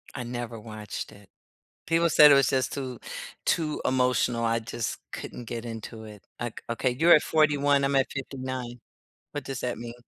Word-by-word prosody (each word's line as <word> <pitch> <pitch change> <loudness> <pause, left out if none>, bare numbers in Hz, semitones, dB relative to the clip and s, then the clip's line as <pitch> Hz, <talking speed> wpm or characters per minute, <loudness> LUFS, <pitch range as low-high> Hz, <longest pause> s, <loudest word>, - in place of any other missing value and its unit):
I 125 - -4
never 120 -1 -5
watched 105 -1 -7
it. 100 -1 -17 0.6
People 165 +1 +3
said 150 -1 +8
it - - +8
was 135 -2 +4
just 130 -1 +1
too 130 -4 -5 0.5
too 155 -3 0
emotional, 125 -2 +2
I 115 0 +2
just 115 0 -4
couldn't 120 - -7
get 115 +1 -5
into 115 0 -7
it, 105 -2 -12 0.2
like, 120 -2 -5
okay. 120 +2 0
You're 170 +3 +7
at 150 - +3
41 145 -2 +3
I'm 140 0 +1
at 135 0 +3
59 130 -3 -5 0.5
What 145 - -5
does 135 -1 -4
that 125 -1 -2
mean? 120 +1 -7
125 Hz, 180 wpm, -27 LUFS, 115-140 Hz, 0.6 s, said